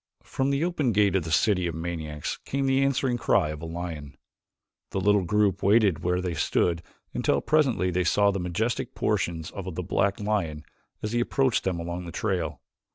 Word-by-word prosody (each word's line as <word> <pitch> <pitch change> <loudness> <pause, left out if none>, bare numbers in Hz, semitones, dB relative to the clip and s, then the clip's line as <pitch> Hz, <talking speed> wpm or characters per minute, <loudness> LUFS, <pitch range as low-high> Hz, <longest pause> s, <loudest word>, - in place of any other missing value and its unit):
From 135 +1 -1
the 140 +2 +1
open 150 -9 0
gate 100 -2 +3
of 90 -4 +1
the 80 - -4
city 90 +2 +3
of 85 - -4
maniacs 80 -3 -4
came 140 0 -1
the 135 0 +3
answering 130 -2 +1
cry 75 - +2
of 75 0 -6
a 85 - -5
lion. 80 -4 -6 0.7
The - - -2
little 105 +1 +3
group 100 0 +1
waited 100 -4 +4
where 90 +2 0
they 90 -2 -2
stood 85 0 +1 0.3
until - - +1
presently 130 -12 +2
they 90 +1 +1
saw 100 +4 +3
the 100 - -2
majestic 95 +7 -2
proportions 80 -2 -1
of 95 -3 -6
the 90 - -3
black 100 +5 0
lion 95 -8 -2 0.4
as 105 - -2
he 120 - +1
approached 130 0 +1
them 90 -3 0
along 85 +1 -4
the - - -6
trail. 85 - -2
95 Hz, 190 wpm, -26 LUFS, 85-110 Hz, 0.7 s, waited